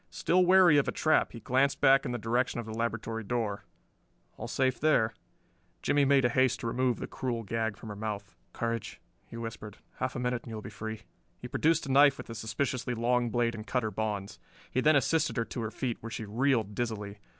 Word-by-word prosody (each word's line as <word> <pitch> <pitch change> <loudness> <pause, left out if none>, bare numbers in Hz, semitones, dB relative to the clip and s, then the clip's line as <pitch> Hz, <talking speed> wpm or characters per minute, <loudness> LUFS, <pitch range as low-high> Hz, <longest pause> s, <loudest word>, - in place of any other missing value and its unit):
Still 175 - +2
wary 180 -4 +6
of 140 - 0
a - - +1
trap 155 - +2
he 115 - -9
glanced 135 +4 +1
back 135 +1 +5
in - - -3
the 120 - -2
direction 120 +2 0
of 120 - -5
the 110 - -6
laboratory 115 0 -3
door: 105 -2 -2 0.7
all - - -6
safe 130 -1 0
there. 115 -8 +3 0.7
Jimmie 145 -1 +3
made 135 -1 +4
haste 130 +1 +2
to - - -5
remove 125 +1 +1
the - - -5
cruel 120 -3 -3
gag 110 0 -2
from 110 - -10
her 105 - -6
mouth. 105 -1 -5 0.2
"Courage," 115 -1 -3 0.3
he 115 - -9
whispered. 115 -3 -7 0.2
"Half - - -2
a - - -2
minute 125 -1 -1
and - - -11
you 110 - -5
will 110 - -7
be - - -8
free." 110 +1 -6 0.4
He 125 - -8
produced 160 +6 +1
a 135 - -3
knife 140 +1 +6
with - - -8
a - - -4
suspiciously 120 +3 -2
long 120 +1 +1
blade 115 +1 +1
and 110 -1 -8
cut 125 -2 0
her 110 - -2
bonds. 105 -3 -3 0.3
He 130 - +1
then 155 +2 +5
assisted 140 +2 +1
her 115 - +1
to 120 - -5
her 110 - -2
feet, 120 +1 -3
where 115 - -6
she 115 -1 -5
reeled 115 -1 +1
dizzily. 105 -3 -4
115 Hz, 220 wpm, -30 LUFS, 110-130 Hz, 0.7 s, wary